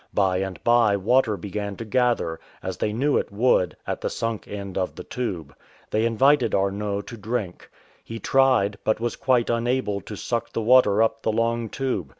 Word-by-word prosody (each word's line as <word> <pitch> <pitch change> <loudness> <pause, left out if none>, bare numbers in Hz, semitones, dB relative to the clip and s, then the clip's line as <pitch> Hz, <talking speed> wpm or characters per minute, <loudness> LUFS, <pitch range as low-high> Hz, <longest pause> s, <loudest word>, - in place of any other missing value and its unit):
By 95 -2 +2
and 95 -1 -4
by 120 -4 +4
water 110 +1 +2
began 100 0 -5
to 115 - -7
gather, 120 -8 0 0.2
as - - -4
they 105 - -1
knew 135 +7 +1
it - - -2
would, 100 -4 +2
at - - -4
the - - -1
sunk 115 -2 -3
end 100 -2 -6
of 95 -1 -2
the - - -8
tube. 90 - -5 0.4
They 110 +2 +2
invited 130 +4 +3
Arnot 100 +1 -1
to 115 - -9
drink. 105 -4 -4 0.3
He 115 - -7
tried, 120 -6 +2
but 110 - +1
was 120 +1 -2
quite 125 -4 +1
unable 115 -3 0
to 105 - -8
suck 115 +2 -3
the - - -1
water 110 -3 +5
up 110 0 -1
the 110 - 0
long 115 +1 0
tube. 125 - -3
110 Hz, 185 wpm, -24 LUFS, 100-120 Hz, 0.4 s, water